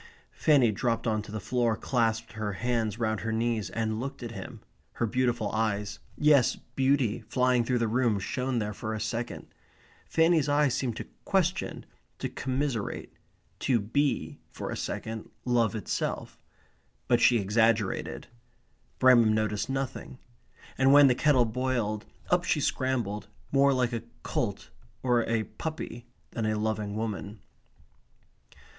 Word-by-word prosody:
Fanny 140 -7 +4
dropped 115 +2 -1
on 110 -2 +1
to 105 - -11
the 110 - -3
floor, 120 +1 0
clasped 115 -2 0
her 110 -2 -3
hands 115 0 -1
round 110 -2 0
her 110 - -3
knees, 115 -1 0
and 110 -1 -2
looked 135 +1 -5
at 115 - -5
him, 100 -4 -8 0.3
her 120 - 0
beautiful 120 +1 0
eyes 105 -2 -1 0.2
yes, 145 -4 +4 0.2
beauty, 130 -4 +2
flying 125 0 +2
through 125 +1 +1
the 115 -1 +1
room, 115 -1 +2
shone 125 +6 -2
there 105 -2 -1
for 110 +2 -4
a - - -4
second. 115 +2 -3 0.6
Fanny's 160 -2 +3
eyes 145 -2 +3
seemed 130 -4 -2
to - - -5 0.2
question, 190 -1 0 0.3
to - - -3
commiserate, 130 -4 -3 0.5
to 125 -3 +2
be, 130 +7 -1
for - - -6
a - - -2
second, 110 -1 -5 0.2
love 120 -3 +2
itself. 105 - -3 0.7
But 120 -1 +3
she 120 +1 +6
exaggerated. 110 0 +1 0.7
Bramham 120 -4 +6
noticed 105 +1 0
nothing. 135 -1 -4 0.6
And 135 +1 +5
when 145 -1 +8
the - - +5
kettle 130 -2 +3
boiled, 115 -3 -1 0.2
up - - +4
she - - +1
scrambled, 110 -6 -1 0.2
more 140 0 +5
like 125 -2 +1
a 115 - -2 0.2
colt 100 -7 -2 0.3
or 120 -2 +3
a 115 -1 +1
puppy 120 -4 -6 0.2
than 110 -2 -2
a 110 0 0
loving 105 -1 -2
woman. 105 -1 -4
115 Hz, 145 wpm, -28 LUFS, 110-130 Hz, 0.7 s, when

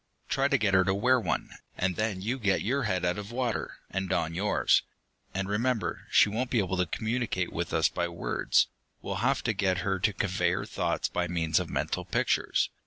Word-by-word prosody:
Try 135 0 +2
to 140 - +3
get 105 -5 +1
her 95 0 +6
to 95 - +2
wear 125 +5 +3
one, - - -2 0.3
and 90 0 0
then 105 -3 -1
you 125 +5 -1
get 100 -4 +1
your 135 +4 0
head 95 -3 0
out 90 +3 0
of 105 +2 -7
water, 120 -2 -2
and 95 -1 -2
don 85 -3 0
yours. 100 +4 +3 0.5
And 95 0 -2
remember, 115 +3 -1
she - - +6
won't 120 +5 -2
be 120 - 0
able 95 -3 0
to 90 -1 +1
communicate 110 -2 -2
with 85 -1 -3
us 80 - +3
by 85 -1 -2
words 85 0 +1 0.4
we'll - - -3
have - - +1
to 115 - +1
get 95 -2 +1
her 95 -1 0
to 105 +3 +2
convey 90 -3 0
her 95 - -2
thoughts - - -1
by 90 0 -1
means 85 -2 +1
of - - -4
mental - - -2
pictures. - - +1
100 Hz, 210 wpm, -29 LUFS, 90-115 Hz, 0.5 s, her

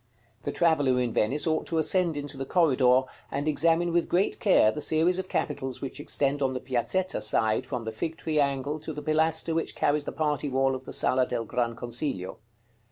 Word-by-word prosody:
The - - -1
traveller 145 -7 +2
in 120 -2 -1
Venice 135 +8 +2
ought 160 -1 0
to 165 - -2
ascend 165 0 +2
into 145 0 -4
the 135 - -4
corridor, 130 -5 +3 0.3
and 140 +2 -3
examine 165 +3 +2
with 170 -1 +1
great 185 +3 +1
care 185 - +4
the 150 - -6
series 165 +5 +2
of 185 - -5
capitals 130 -3 -3
which 135 - -6
extend 145 -1 0
on 130 -1 0
the - - -2
Piazzetta 130 - -1
side 110 +3 +1
from 125 -4 -4
the 110 - -3
Fig 160 +9 -4
tree 155 -1 -1
angle 140 +1 -1
to 155 +1 -6
the 150 - -7
pilaster 160 +1 +1
which 165 0 -2
carries 145 0 +1
the - - -4
party 150 -2 -1
wall 135 0 +1
of 130 0 -6
the - - -8
Sala 130 0 +2
del 115 -2 -3
Gran 120 0 -2
Consiglio. 120 -5 -4
145 Hz, 205 wpm, -27 LUFS, 130-160 Hz, 0.3 s, care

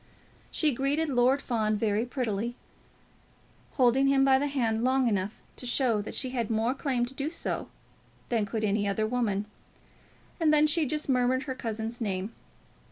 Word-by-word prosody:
She 305 -3 +2
greeted 285 +5 0
Lord 260 +2 +3
Fawn 215 -3 0
very 215 +2 0
prettily, 235 -2 -2 1.2
holding 260 +1 +3
him 270 0 +4
by 265 -1 +5
the 290 - 0
hand 230 -5 0
long 260 0 +2
enough 205 -1 -2
to 250 - -5
show 240 -4 +2
that 205 - -7
she 260 -2 +1
had 235 -4 -2
more 225 +2 +1
claim 260 -3 -1
to 250 - -10
do 275 +2 -3
so 335 - -4 0.6
than 225 -4 0
could 220 +2 -3
any 205 0 +1
other 210 +2 0
woman, 215 -4 -1 0.9
and 320 -2 +3
then 305 0 +5
she 305 0 +2
just 305 +3 -3
murmured 255 0 +2
her 265 - -4
cousin's 225 -1 -5
name. 195 0 -2
245 Hz, 165 wpm, -28 LUFS, 220-270 Hz, 1.2 s, by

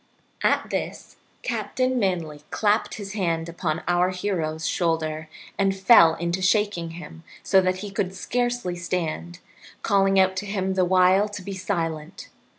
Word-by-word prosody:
At - - +1
this - - -5 0.3
Captain 250 +3 -1
Manly 170 -7 -1
clapped 210 0 +1
his 200 -2 -7
hand 170 -5 -1
upon 165 -2 -3
our 175 +1 +3
hero's 170 -4 -2
shoulder 155 -2 -1 0.3
and 195 -1 +2
fell 190 -6 +6
to 170 +2 -2
shaking 190 -3 +1
him 165 -2 -10 0.2
so 190 - +4
that 185 0 -1
he 205 - -7
could 190 -1 -2
scarcely 245 -2 -1
stand, 165 - -3 0.5
calling 195 -1 +3
out 190 0 +3
to 205 +2 -3
him 190 -2 -1
the 185 -1 +2
while 185 +3 +4
to 205 -2 -7
be 195 - -5
silent. 165 -4 -4
185 Hz, 150 wpm, -24 LUFS, 165-200 Hz, 0.5 s, fell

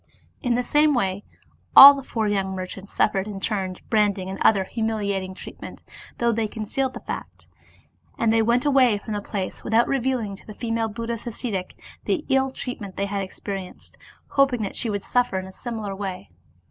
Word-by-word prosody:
In 245 -4 +1
the 250 - 0
same 295 +3 +3
way 195 -3 -1 0.5
all 280 +1 +13
the 280 - -5
four 225 -4 -2
young 195 -2 -1
merchants 190 +1 -7
suffered 195 0 +1
in 200 -2 -6
turns 190 -3 -3
branding 205 -4 0
and 195 - -7
other 200 -3 +4
humiliating 200 -4 -2
treatment, - - -10 0.3
though 235 0 +2
they 225 -1 0
concealed 240 +5 -3
the - - -5
fact. - - -7 0.7
And 225 -1 +2
they 225 - +4
went 235 +4 +2
away 260 -6 +4
from 215 +2 -6
the 205 - -2
place, 200 -2 -5
without 225 +2 +3
revealing 250 -6 -1
to - - -17
the 215 - -9
female 225 -1 -1
Buddhist 230 +2 -5
ascetic 210 -5 -4 0.3
the 320 -5 -1
ill 265 0 +3
treatment 230 -7 -7
they 200 - 0
had 200 0 -2
experienced, 190 0 -7 0.3
hoping 270 -5 +2
that 200 - -4
she 235 - -1
would 205 -2 -2
suffer 245 -6 +1
in 185 - -3
a 190 - -10
similar 220 -4 -5
way. 185 - -6
215 Hz, 185 wpm, -24 LUFS, 195-240 Hz, 0.7 s, all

